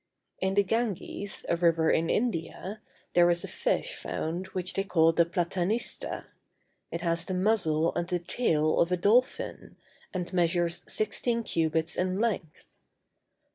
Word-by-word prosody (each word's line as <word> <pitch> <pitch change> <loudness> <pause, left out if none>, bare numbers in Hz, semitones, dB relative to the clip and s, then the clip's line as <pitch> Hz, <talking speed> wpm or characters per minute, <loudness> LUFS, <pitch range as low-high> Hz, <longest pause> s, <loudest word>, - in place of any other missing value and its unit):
In 190 0 0
the 205 - +5
Ganges, 205 -2 -2
a - - +2
river 165 -2 +3
of - - +4
India, 210 -1 -2 0.3
there 175 0 +6
is 170 0 +1
a - - -4
fish - - -1
found 170 +4 -4
which 185 -1 -3
they 195 - 0
call 165 -4 +4
the 170 0 +3
platanista; 180 +5 -2 0.6
it 170 - -4
has 170 -1 0
the 185 +1 -3
muzzle 180 -5 +2
and 175 0 -2
the 180 - 0
tail 160 -4 +1
of 170 - +3
the 180 - +1
dolphin, 250 - +1 0.4
and 180 -1 -4
measures 175 -1 +1
sixteen 230 +2 0
cubits 160 -2 0
in 185 +1 0
length. 195 -9 -3
180 Hz, 145 wpm, -28 LUFS, 170-200 Hz, 0.6 s, there